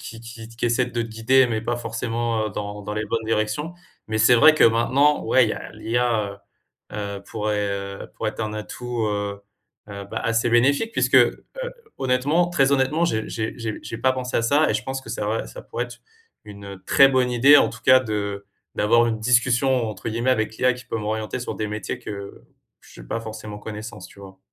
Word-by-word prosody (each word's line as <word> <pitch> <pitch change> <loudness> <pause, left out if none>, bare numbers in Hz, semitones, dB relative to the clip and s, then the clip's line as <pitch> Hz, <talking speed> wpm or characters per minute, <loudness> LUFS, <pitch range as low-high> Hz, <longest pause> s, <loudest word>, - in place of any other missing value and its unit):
qui 115 - -9
qui 115 -1 -10
t 115 - -16
qui - - -3
essaie 120 +1 +1
de 125 - -10
te 115 - -5
guider 115 +4 +3
mais 110 -2 -2
pas 120 +1 -2
forcément, 115 -1 -2
heu, - - -4
dans 105 0 -6
dans 105 - -5
les 105 - -2
bonnes 115 -1 -2
directions. 110 +10 -1 0.3
Mais 110 0 -1
c'est 110 +3 +6
vrai 155 +7 +8
que - - +5
maintenant 130 +6 +3
ouais 130 -3 +4
il - - -2
y - - 0
a - - -8
l'IA, 110 -3 -1 0.5
heu - - -9
heu, 100 -1 -5
pourrait, 105 -2 -2
heu, 100 0 -6
pourrait - - -1
être - - -9
un 110 -1 -2
atout, 120 +2 -4
heu 100 -1 -3 0.5
heu, 100 -1 -7
bah, - - -3
assez 115 +1 0
bénéfique 140 - +3
puisque, - - 0
heu, - - +4 0.5
honnêtement, 140 +7 +1
très 140 -5 +2
honnêtement, 140 +5 +2
j'ai 110 -10 -1
j'ai 110 -1 -3
j'ai 110 -2 -4
j'ai 115 - -6
pas 130 0 +2
pensé 125 -1 -3
à 115 - +1
ça 145 +6 +3
et - - 0
je 110 - -1
pense 135 0 -4
que - - -13
c'est - - -4
vrai, 105 +2 -1
ça - - -10
pourrait - - -4
être - - -12 0.5
une 100 -2 -10
très 135 -1 +6
bonne 130 -2 +2
idée 135 +5 +7
en - - +3
tout - - -11
cas 130 -1 +7
de 100 -4 -4 0.3
d'avoir 115 +3 +4
une 110 -1 -1
«discussion», 125 +1 +2
entre 105 +1 -6
guillemets 115 +3 0
avec 110 -2 0
l'IA 125 0 +3
qui 125 - -11
peut - - -3
m'orienter 110 +2 -3
sur 125 - -4
des 110 - -2
métiers 105 -1 -4
que 100 -1 -8 0.4
j'ai - - -14
pas 115 - -3
forcément 110 -2 -8
connaissance, 105 -3 -8
tu 100 - -16
vois? 95 -1 -12
115 Hz, 220 wpm, -23 LUFS, 105-125 Hz, 0.5 s, vrai